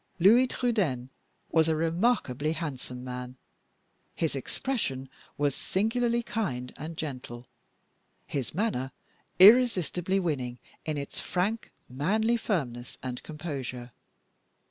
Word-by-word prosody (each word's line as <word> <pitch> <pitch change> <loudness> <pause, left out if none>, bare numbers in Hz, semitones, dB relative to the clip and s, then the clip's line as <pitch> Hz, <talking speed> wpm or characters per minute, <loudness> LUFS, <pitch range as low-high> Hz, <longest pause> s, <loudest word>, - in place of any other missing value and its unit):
Louis 225 +9 +6
Trudaine 190 - 0 0.4
was 160 -1 +4
a 160 - +3
remarkably 165 - +1
handsome 130 -6 -5
man. 125 0 -6 0.8
His 160 -3 0
expression 135 - -2 0.3
was 145 -2 +2
singularly 235 - +1
kind 130 - -3
and 160 +2 -7
gentle; 125 -5 -5 0.8
his 140 0 -3
manner 170 - 0 0.5
irresistibly 195 -4 +6
winning 130 -9 -2 0.3
in 155 -1 -1
its 140 0 -5
frank, 205 +5 -1 0.2
manly 215 - +1
firmness 125 - -2
and 125 -1 -4
composure. 135 -6 -5
155 Hz, 100 wpm, -29 LUFS, 130-210 Hz, 0.8 s, Louis